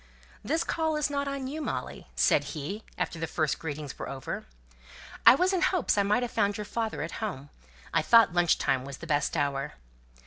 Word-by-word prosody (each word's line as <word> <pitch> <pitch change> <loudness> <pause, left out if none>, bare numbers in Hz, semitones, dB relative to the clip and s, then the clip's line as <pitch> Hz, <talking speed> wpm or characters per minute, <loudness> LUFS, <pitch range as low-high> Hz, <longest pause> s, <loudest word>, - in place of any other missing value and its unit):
"This 325 - 0
call 320 -1 0
is 300 -1 0
not 280 0 -1
on 275 -1 -3
you, 295 +4 -4
Molly," - - -4
said - - +4
he, 180 +9 -4 0.2
after 165 - -2
the 165 - -2
first 155 -3 -1
greetings 150 -3 -6
were - - -5
over. 135 -2 -5 0.8
"I - - +11
was 365 +5 +2
in 370 - +1
hopes 370 -2 +2
I 205 - +3
might 210 +5 +2
have 245 - -3
found 200 0 +1
your 210 - -4
father 225 +1 -2
at - - -5
home; 145 -10 -4 0.4
I 165 - +4
thought 230 +2 +6
lunch 175 -2 +3
time 135 -2 0
was 135 0 -7
the - - -9
best 150 +1 0
hour." 140 -2 -1
200 Hz, 205 wpm, -28 LUFS, -, 0.8 s, I